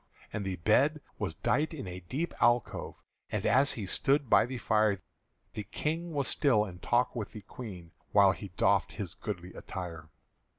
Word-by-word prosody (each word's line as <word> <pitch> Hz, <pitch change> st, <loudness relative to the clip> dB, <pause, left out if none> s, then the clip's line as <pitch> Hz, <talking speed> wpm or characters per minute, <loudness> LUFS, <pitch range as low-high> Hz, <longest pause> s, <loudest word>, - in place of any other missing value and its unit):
And 105 Hz, -, -2 dB
the 95 Hz, -1 st, -2 dB
bed 130 Hz, -, +3 dB, 0.2 s
was -, -, -2 dB
dight 155 Hz, +4 st, 0 dB
in 135 Hz, -10 st, -6 dB
a 90 Hz, 0 st, -6 dB
deep 135 Hz, -, -3 dB
alcove; 120 Hz, -1 st, +2 dB, 0.4 s
And 105 Hz, -1 st, -1 dB
as 130 Hz, +6 st, +5 dB
he 105 Hz, -, -4 dB
stood 135 Hz, +6 st, +1 dB
by -, -, +6 dB
the 130 Hz, 0 st, -4 dB
fire 110 Hz, -3 st, +2 dB, 0.5 s
The -, -, -4 dB
King 160 Hz, -, -3 dB
was 140 Hz, -3 st, -1 dB
still 125 Hz, -8 st, +3 dB
in 90 Hz, -4 st, -9 dB
talk 120 Hz, +6 st, +1 dB
with 110 Hz, -4 st, -4 dB
the 105 Hz, -, -7 dB
Queen 95 Hz, -5 st, -9 dB, 0.2 s
While 100 Hz, -2 st, +6 dB
he 100 Hz, -, -6 dB
doffed -, -, +3 dB
his -, -, -4 dB
goodly 90 Hz, +1 st, -6 dB
attire. 85 Hz, -4 st, -7 dB
110 Hz, 175 wpm, -31 LUFS, 95-135 Hz, 0.5 s, by